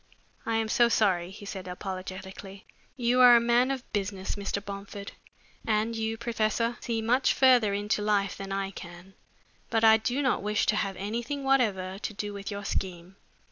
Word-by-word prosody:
"I 225 - 0
am 225 0 0
so 235 +2 +3
sorry," 185 -7 +2
he 205 +2 -11
said 190 -2 -7
apologetically. 190 +1 -7 0.3
"You 245 0 +2
are 245 -1 +9
a - - +7
man 240 +2 +3
of 270 -2 -2
business, 195 -2 -2
Mr. 200 0 -3
Bomford, 200 0 -7 0.5
and 220 +1 0
you, 225 0 -2
professor, 230 0 -1
see 225 -2 -2
much 250 +4 +2
further 250 -5 +5
into 205 +1 -1
life 205 -2 +1
than 195 0 -7
I 195 0 -2
can, 175 +1 -11 0.6
but 225 0 +1
I 220 0 +8
do 245 +6 -1
not 260 - +1
wish 210 0 0
to 215 - +2
have 200 -2 -1
anything 235 +8 -4
whatever 200 -9 +1
to 215 - -4
do 205 0 -4
with 200 -1 -6
your 200 -1 -6
scheme. 185 -1 -4
210 Hz, 180 wpm, -28 LUFS, 195-235 Hz, 0.6 s, are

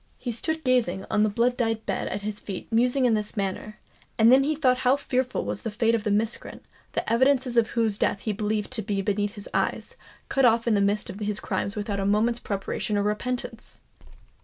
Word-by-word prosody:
He 245 - -4
stood 315 +7 -2
gazing 230 -8 +1
on 210 - +2
the 215 - +3
blood 235 +4 +1
dyed 225 -3 -1
bed - - -2
at 200 - -4
his 210 0 -3
feet 195 +1 -7
musing 250 +3 +3
in 240 - +4
this 210 0 -2
manner; 200 +2 -3 0.4
and 225 +1 +6
then 265 +1 +6
he 305 +2 0
thought 255 -4 +2
how 255 +1 +4
fearful 255 -2 -1
was - - -3
the 225 - -3
fate 225 +2 +1
of 225 -2 0
the 210 - -1
miscreant, 215 +3 -2 0.3
the - - -2
evidences 255 +2 +2
of 235 -1 +3
whose 220 -3 +1
death 200 - 0
he 215 - -2
believed 210 +1 -2
to 245 -4 -1
be 200 -1 -2
beneath 205 0 -1
his 205 - -9
eyes, - - -1 0.3
cut 270 - +1
off 230 -1 +4
in 230 - +4
the 200 - +3
midst 200 +1 0
of 200 - -10
his 210 -1 -2
crimes 200 +2 -2
without 205 -1 -3
a 195 - -1
moment's 225 +4 +2
preparation 200 +1 -2
or 200 - +1
repentance! 230 +2 -3
220 Hz, 220 wpm, -26 LUFS, 205-245 Hz, 0.4 s, and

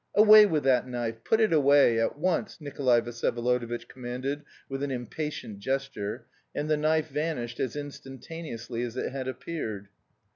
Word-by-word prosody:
"Away 215 0 +9
with 155 -6 0
that 130 -2 +3
knife; 115 -2 -4
put 220 - +2
it 220 -5 +3
away, 140 -5 +5
at 115 +5 0
once!" 175 +2 -1
Nikolay 135 -5 +2
Vsyevolodovitch 120 0 -1
commanded 130 +3 -4 0.3
with 135 0 -4
an 140 - -1
impatient 125 -3 -5
gesture, 135 -3 -3 0.3
and 145 - -2
the 155 - +3
knife 155 +1 +1
vanished 145 -5 -3
as 130 -1 -2
instantaneously 135 -3 -6
as 120 0 -4
it - - -2
had 130 -1 -4
appeared. 120 -7 -5
135 Hz, 150 wpm, -28 LUFS, 120-150 Hz, 0.3 s, Away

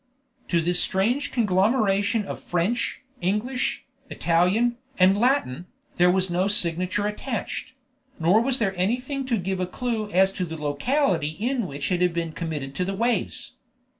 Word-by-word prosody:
To 170 -2 +2
this 175 +2 +4
strange 240 +10 0
conglomeration 205 0 +2
of - - -6
French, 180 +11 -1 0.2
English, 210 +8 -1 0.2
Italian, 190 +8 +2 0.2
and 185 +1 +5
Latin, 205 - 0 0.3
there 180 0 +5
was 185 0 +2
no 180 +2 +1
signature 185 0 +1
attached; 225 +4 -4 0.5
nor 175 +7 +4
was 260 +1 +2
there 200 -6 0
anything 250 +8 -1
to 235 -3 +1
give 190 0 -2
a 180 - -1
clue 220 +1 -3
as 190 0 +3
to 185 - -2
the 160 -1 -7
locality 160 - 0
in 240 -1 -1
which 140 0 -4
it 180 -1 +1
had 180 -2 +2
been 165 -1 -2
committed 155 -5 -5
to 180 - +1
the 195 +2 -3
waves. 235 +4 -1
195 Hz, 155 wpm, -24 LUFS, 175-235 Hz, 0.5 s, and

